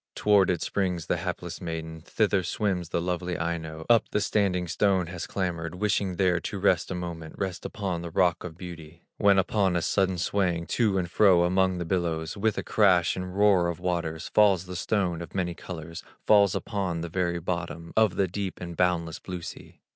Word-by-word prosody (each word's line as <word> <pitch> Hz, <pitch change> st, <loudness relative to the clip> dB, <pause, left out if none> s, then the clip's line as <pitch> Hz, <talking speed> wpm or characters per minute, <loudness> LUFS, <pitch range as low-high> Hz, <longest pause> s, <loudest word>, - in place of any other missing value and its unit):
Toward 105 Hz, -2 st, +4 dB
it 85 Hz, -3 st, 0 dB
springs 90 Hz, -5 st, -1 dB
the -, -, 0 dB
hapless 90 Hz, 0 st, -5 dB
maiden, 80 Hz, -1 st, -5 dB
Thither 100 Hz, +1 st, +1 dB
swims 90 Hz, -2 st, -2 dB
the -, -, 0 dB
lovely 90 Hz, 0 st, -2 dB
Aino, 80 Hz, -2 st, -4 dB
Up 115 Hz, -2 st, +4 dB
the -, -, 0 dB
standing 95 Hz, -4 st, +1 dB
stone 95 Hz, +1 st, +2 dB
has 85 Hz, 0 st, -6 dB
clambered, 85 Hz, -3 st, -3 dB
Wishing 95 Hz, -1 st, 0 dB
there 90 Hz, -1 st, +2 dB
to -, -, -5 dB
rest -, -, +2 dB
a 95 Hz, -, -3 dB
moment, 85 Hz, -2 st, -6 dB
Rest 95 Hz, -3 st, -3 dB
upon 95 Hz, -5 st, -3 dB
the 85 Hz, -, -5 dB
rock 90 Hz, 0 st, +2 dB
of 85 Hz, -2 st, -8 dB
beauty; 85 Hz, -2 st, -10 dB
When 100 Hz, -1 st, +4 dB
upon 95 Hz, 0 st, +2 dB
a 85 Hz, -, +1 dB
sudden 95 Hz, -2 st, +1 dB
swaying 85 Hz, -2 st, 0 dB
To 105 Hz, +2 st, +1 dB
and 90 Hz, -2 st, 0 dB
fro 90 Hz, -1 st, +5 dB
among 95 Hz, +1 st, +2 dB
the 85 Hz, -, -3 dB
billows, 80 Hz, -3 st, -1 dB
With 110 Hz, +1 st, 0 dB
a -, -, -2 dB
crash 90 Hz, -5 st, +3 dB
and 90 Hz, 0 st, -5 dB
roar 100 Hz, -4 st, +4 dB
of 85 Hz, -1 st, -3 dB
waters 85 Hz, -2 st, -2 dB
Falls 100 Hz, -4 st, +4 dB
the 90 Hz, 0 st, -7 dB
stone 90 Hz, -2 st, -1 dB
of 85 Hz, -, -9 dB
many 90 Hz, -2 st, -1 dB
colors, 85 Hz, -2 st, -8 dB, 0.2 s
Falls 100 Hz, -3 st, +5 dB
upon 95 Hz, -6 st, -2 dB
the 85 Hz, -, -3 dB
very 85 Hz, 0 st, -1 dB
bottom 85 Hz, -1 st, -4 dB
Of 110 Hz, -4 st, +3 dB
the 95 Hz, -, +2 dB
deep 95 Hz, +1 st, -4 dB
and 85 Hz, -1 st, -6 dB
boundless 85 Hz, -2 st, 0 dB
blue 90 Hz, -2 st, -7 dB
sea. -, -, -10 dB
90 Hz, 195 wpm, -27 LUFS, 85-95 Hz, 0.2 s, fro